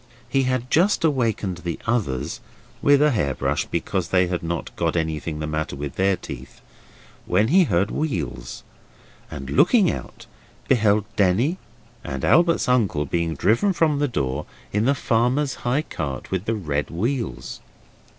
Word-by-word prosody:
He 135 Hz, +2 st, +1 dB
had 130 Hz, 0 st, -1 dB
just 180 Hz, +4 st, +3 dB
awakened 115 Hz, -, 0 dB
the 85 Hz, -2 st, -4 dB
others 85 Hz, -, -1 dB, 0.4 s
(with 145 Hz, 0 st, +5 dB
a 150 Hz, -, +4 dB
hair 70 Hz, -, 0 dB
brush -, -, -1 dB
because 95 Hz, -3 st, -2 dB
they 90 Hz, 0 st, +3 dB
had 90 Hz, 0 st, -2 dB
not 85 Hz, -1 st, -4 dB
got 85 Hz, -1 st, 0 dB
anything 80 Hz, -1 st, -2 dB
the 75 Hz, -, -3 dB
matter 80 Hz, -1 st, -3 dB
with 70 Hz, 0 st, -5 dB
their 95 Hz, 0 st, +2 dB
teeth), 65 Hz, -6 st, -9 dB, 0.7 s
when 105 Hz, +5 st, +2 dB
he 185 Hz, +4 st, +5 dB
heard 100 Hz, -, +1 dB
wheels, 70 Hz, -, -3 dB, 0.7 s
and, 70 Hz, -2 st, -7 dB
looking 195 Hz, -, +4 dB
out, -, -, -8 dB, 0.4 s
beheld 105 Hz, -4 st, +3 dB
Denny 110 Hz, -, +2 dB, 0.4 s
and 65 Hz, -1 st, -4 dB
Albert's 170 Hz, -2 st, +4 dB
uncle 105 Hz, -, +2 dB
being 85 Hz, +2 st, -1 dB
driven 155 Hz, -, +2 dB
from 155 Hz, -4 st, +2 dB
the 145 Hz, -, +2 dB
door 70 Hz, -, -2 dB, 0.3 s
in 105 Hz, +2 st, +1 dB
the 140 Hz, +2 st, +3 dB
farmer's 125 Hz, +4 st, +1 dB, 0.2 s
high 140 Hz, +5 st, +1 dB
cart 70 Hz, -, -5 dB
with 95 Hz, +1 st, -2 dB
the 115 Hz, -, 0 dB
red 75 Hz, -8 st, -2 dB
wheels. 115 Hz, +8 st, -3 dB
100 Hz, 155 wpm, -23 LUFS, 80-130 Hz, 0.7 s, with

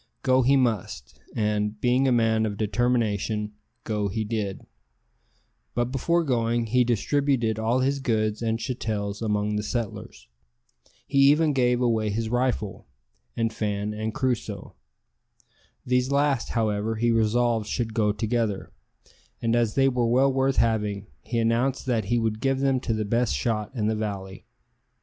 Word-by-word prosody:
Go 130 Hz, 0 st, +4 dB
he 135 Hz, +3 st, +4 dB
must, 110 Hz, -, -2 dB, 0.2 s
and, 105 Hz, -1 st, -1 dB
being 125 Hz, +3 st, +2 dB
a -, -, +3 dB
man 110 Hz, -2 st, +2 dB
of 105 Hz, -1 st, -5 dB
determination, 110 Hz, -2 st, 0 dB, 0.3 s
go 105 Hz, -2 st, -1 dB
he 110 Hz, +3 st, -2 dB
did; 105 Hz, -3 st, -3 dB, 1.1 s
but 120 Hz, +1 st, 0 dB
before 170 Hz, +6 st, +1 dB
going 120 Hz, -4 st, 0 dB
he 125 Hz, +3 st, +3 dB
distributed 120 Hz, -1 st, +1 dB
all 115 Hz, +4 st, +1 dB
his 140 Hz, +2 st, +1 dB
goods 110 Hz, -4 st, 0 dB
and 115 Hz, -1 st, 0 dB
chattels 110 Hz, -4 st, -3 dB
among 105 Hz, -1 st, 0 dB
the -, -, 0 dB
settlers. 115 Hz, 0 st, -5 dB, 0.8 s
He 140 Hz, -, 0 dB
even 150 Hz, +1 st, +3 dB
gave 125 Hz, -2 st, +2 dB
away 110 Hz, -3 st, +1 dB
his 110 Hz, +2 st, -2 dB
rifle, 120 Hz, -, -1 dB, 0.5 s
and 115 Hz, -1 st, 0 dB
Fan 105 Hz, -1 st, -2 dB
and 110 Hz, +1 st, -3 dB
Crusoe. 125 Hz, -1 st, -3 dB, 1.1 s
These 125 Hz, +1 st, +1 dB
last, 140 Hz, -3 st, +1 dB
however, 110 Hz, 0 st, 0 dB
he 120 Hz, +2 st, +1 dB
resolved 115 Hz, 0 st, +1 dB
should 115 Hz, -1 st, -2 dB
go 105 Hz, -2 st, +2 dB
together; 110 Hz, -1 st, -2 dB, 0.7 s
and 115 Hz, 0 st, +1 dB
as 115 Hz, -3 st, +1 dB
they 135 Hz, 0 st, +4 dB
were 125 Hz, -3 st, +1 dB
well 130 Hz, +3 st, +3 dB
worth 135 Hz, 0 st, +1 dB
having, 105 Hz, -3 st, 0 dB, 0.2 s
he 120 Hz, -, -4 dB
announced 120 Hz, +5 st, +1 dB
that 115 Hz, -5 st, 0 dB
he 120 Hz, +4 st, +1 dB
would 110 Hz, -2 st, -1 dB
give 135 Hz, 0 st, +1 dB
them 135 Hz, -2 st, +2 dB
to 115 Hz, -, -2 dB
the 110 Hz, -1 st, -2 dB
best 115 Hz, +3 st, +1 dB
shot 105 Hz, -3 st, -1 dB
in 110 Hz, -4 st, -1 dB
the 110 Hz, +1 st, +1 dB
valley. 100 Hz, -3 st, -5 dB
115 Hz, 155 wpm, -25 LUFS, 105-125 Hz, 1.1 s, Go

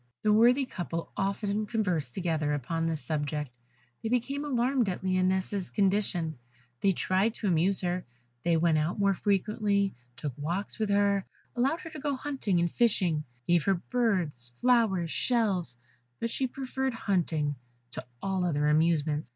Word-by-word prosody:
The 210 Hz, -1 st, +4 dB
worthy 245 Hz, +5 st, +5 dB
couple 170 Hz, -7 st, -5 dB
often 200 Hz, +2 st, -1 dB
conversed 180 Hz, -, -1 dB
together 160 Hz, -5 st, 0 dB
upon 165 Hz, +4 st, -2 dB
this 160 Hz, -4 st, -2 dB
subject; 145 Hz, -2 st, -3 dB, 0.5 s
they 225 Hz, -, -2 dB
became 275 Hz, +4 st, 0 dB
alarmed 250 Hz, -4 st, +1 dB
at 180 Hz, -, -4 dB
Lionette's 185 Hz, +1 st, 0 dB
condition; 190 Hz, -, 0 dB, 0.4 s
they 200 Hz, -, +3 dB
tried 190 Hz, +5 st, +1 dB
to 210 Hz, -, -2 dB
amuse 185 Hz, +2 st, +2 dB
her; 180 Hz, 0 st, -1 dB, 0.4 s
they 170 Hz, -1 st, +3 dB
went 160 Hz, -1 st, +3 dB
out 155 Hz, +4 st, -1 dB
more 200 Hz, -1 st, +3 dB
frequently, 200 Hz, 0 st, +1 dB, 0.2 s
took 135 Hz, -1 st, -4 dB
walks 175 Hz, +10 st, -3 dB
with 215 Hz, -2 st, 0 dB
her, 200 Hz, -1 st, +3 dB, 0.3 s
allowed 275 Hz, +7 st, +1 dB
her 325 Hz, -, -8 dB
to 310 Hz, -, -7 dB
go 285 Hz, 0 st, -1 dB
hunting 260 Hz, -10 st, -1 dB
and 170 Hz, -1 st, +1 dB
fishing, 180 Hz, -10 st, +2 dB, 0.2 s
gave 175 Hz, -2 st, +3 dB
her 195 Hz, -, +3 dB
birds, 175 Hz, -, -1 dB
flowers, 220 Hz, -9 st, +3 dB
shells; 195 Hz, -, +1 dB, 0.4 s
but 230 Hz, 0 st, -2 dB
she 265 Hz, -, 0 dB
preferred 265 Hz, 0 st, -3 dB
hunting 165 Hz, -9 st, 0 dB, 0.4 s
to -, -, -5 dB, 0.2 s
all 190 Hz, -1 st, 0 dB
other 150 Hz, -4 st, +1 dB
amusements. 155 Hz, -2 st, +2 dB
190 Hz, 150 wpm, -29 LUFS, 165-225 Hz, 0.5 s, worthy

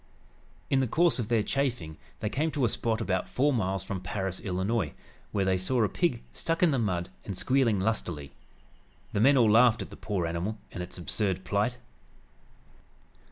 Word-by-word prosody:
In 135 Hz, -, +4 dB
the 130 Hz, -, +1 dB
course 170 Hz, +4 st, +3 dB
of 115 Hz, -, -2 dB
their 115 Hz, -2 st, +2 dB
"chaffing" 125 Hz, -, -1 dB, 0.3 s
they 105 Hz, -, 0 dB
came 150 Hz, +8 st, 0 dB
to 140 Hz, -4 st, +1 dB
a -, -, +2 dB
spot 115 Hz, 0 st, -1 dB
about 95 Hz, -4 st, -1 dB
four 145 Hz, +3 st, +2 dB
miles 95 Hz, -5 st, 0 dB
from 95 Hz, -1 st, -4 dB
Paris, 95 Hz, 0 st, -3 dB
Illinois, 95 Hz, -2 st, -1 dB, 0.4 s
where 100 Hz, -2 st, +1 dB
they 95 Hz, -1 st, +2 dB
saw 120 Hz, +5 st, +1 dB
a 105 Hz, -, +2 dB
pig 160 Hz, -10 st, 0 dB
stuck 165 Hz, +1 st, -1 dB
in 170 Hz, -, +5 dB
the 135 Hz, -, +1 dB
mud 90 Hz, -5 st, -1 dB
and 100 Hz, -3 st, -5 dB
squealing 125 Hz, -5 st, +2 dB
lustily. 90 Hz, -9 st, -2 dB, 0.8 s
The 100 Hz, -, +1 dB
men 135 Hz, +4 st, +6 dB
all 115 Hz, -4 st, +5 dB
laughed 115 Hz, 0 st, +5 dB
at -, -, -12 dB
the -, -, -8 dB
poor 100 Hz, -5 st, -2 dB
animal 85 Hz, +6 st, -2 dB
and 90 Hz, -, -5 dB
its 90 Hz, -, -6 dB
absurd 95 Hz, +1 st, -1 dB
plight. 105 Hz, +6 st, 0 dB
105 Hz, 185 wpm, -29 LUFS, 95-125 Hz, 0.8 s, men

